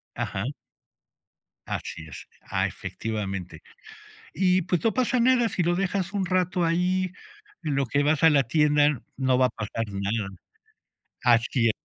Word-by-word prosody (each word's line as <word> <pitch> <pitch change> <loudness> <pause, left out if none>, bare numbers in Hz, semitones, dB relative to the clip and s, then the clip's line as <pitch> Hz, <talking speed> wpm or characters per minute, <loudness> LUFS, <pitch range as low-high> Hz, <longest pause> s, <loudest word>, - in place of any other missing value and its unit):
Ajá. 95 +5 -3 1.2
Así 80 - -5
es. - - -10 0.2
Ah - - +1
efectivamente. 95 -6 -5 0.7
Y, 185 -1 +3
pues, 175 -1 -1
no 225 - +2
pasa 255 -1 +1
nada 240 -2 +4
si 180 - -1
lo 175 +1 +2
dejas 195 0 -1
un 195 -2 0
rato 180 0 +1
ahí, 180 +2 +1 0.5
en 145 -3 -1
lo 140 -1 +1
que 140 +5 +1
vas 150 +1 +1
a 160 - +9
la 140 -3 +4
tienda, 150 0 +3 0.2
no 130 -2 +2
va 130 0 +4
a - - -6
pasar 115 +1 -4
nada. 100 +1 -2 0.9
Así 120 0 +3
e - - +4
150 Hz, 150 wpm, -26 LUFS, 115-185 Hz, 1.2 s, a